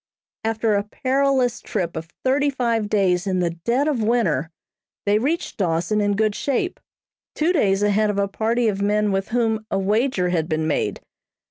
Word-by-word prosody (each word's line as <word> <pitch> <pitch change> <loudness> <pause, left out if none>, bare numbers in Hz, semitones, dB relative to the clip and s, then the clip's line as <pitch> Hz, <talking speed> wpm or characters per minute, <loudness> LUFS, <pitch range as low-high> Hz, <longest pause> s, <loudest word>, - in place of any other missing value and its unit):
After 225 0 0
a 200 - +2
perilous 260 +2 0
trip 175 -5 -3
of 160 0 -5 0.2
thirty 285 +2 +3
five 235 -5 -1
days 190 -3 +1
in 185 -1 0
the 175 -2 +1
dead 235 - 0
of 280 -7 0
winter, 210 - +1 0.6
they 205 +1 +3
reached 300 +8 -2
Dawson 180 +3 0
in 205 0 +1
good 215 0 +1
shape, 285 - -2 0.6
two 325 +4 +2
days 200 - +2
ahead 210 +1 +2
of 205 - -1
a 200 0 +1
party 225 +4 0
of 200 -2 -1
men 210 +1 +1
with 195 0 -1
whom 225 -2 0
a - - 0
wager 205 -1 +1
had 165 -2 -1
been 155 0 0
made. 155 - -1
210 Hz, 175 wpm, -22 LUFS, 195-240 Hz, 0.6 s, thirty